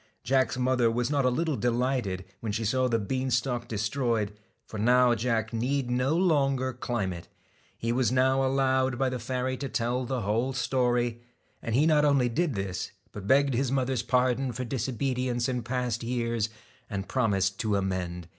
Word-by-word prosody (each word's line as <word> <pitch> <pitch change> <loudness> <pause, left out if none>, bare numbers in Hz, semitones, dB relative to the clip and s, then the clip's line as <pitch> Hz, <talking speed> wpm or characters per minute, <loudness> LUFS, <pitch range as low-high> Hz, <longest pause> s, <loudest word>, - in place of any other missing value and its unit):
Jack's 130 0 +1
mother 125 -2 +2
was 120 +3 -1
not 140 -3 +2
a - - +5
little 155 +4 0
delighted 120 -5 -1
when 110 - -3
she 110 +2 -2
saw 130 +4 +2
the 115 -2 +1
bean 130 +5 -2
stalk 120 0 0
destroyed, 110 -1 -1 0.3
for 110 - -7
now 125 +2 +5
Jack 115 -1 -1
need 125 +2 -1
no 130 +6 +1
longer 135 -7 +2
climb 120 -6 -2
it. 85 -1 -9 0.5
He 115 - -2
was 125 -2 +1
now 130 +1 +3
allowed 130 -1 +1
by 135 0 +1
the 125 0 -4
fairy 130 +2 -2
to 140 0 -4
tell 125 +2 -1
the 125 0 -2
whole 115 +6 0
story; 120 -2 0 0.4
and 115 - -2
he 145 +4 +4
not 155 -2 +4
only 140 -4 +3
did 150 +2 0
this, 95 -2 -3 0.2
but 100 -2 -8
begged 140 +2 +4
his 130 +1 0
mother's 130 -2 0
pardon 125 +1 +1
for 130 - -4
dis 125 +1 -2
obedience 125 -1 -1
in 125 -2 -1
past 120 0 -2
years, 115 -2 -1 0.4
and 100 -3 -4
promised 100 -6 +1
to 110 -2 0
amend. 90 -3 -2
125 Hz, 180 wpm, -28 LUFS, 115-130 Hz, 0.5 s, a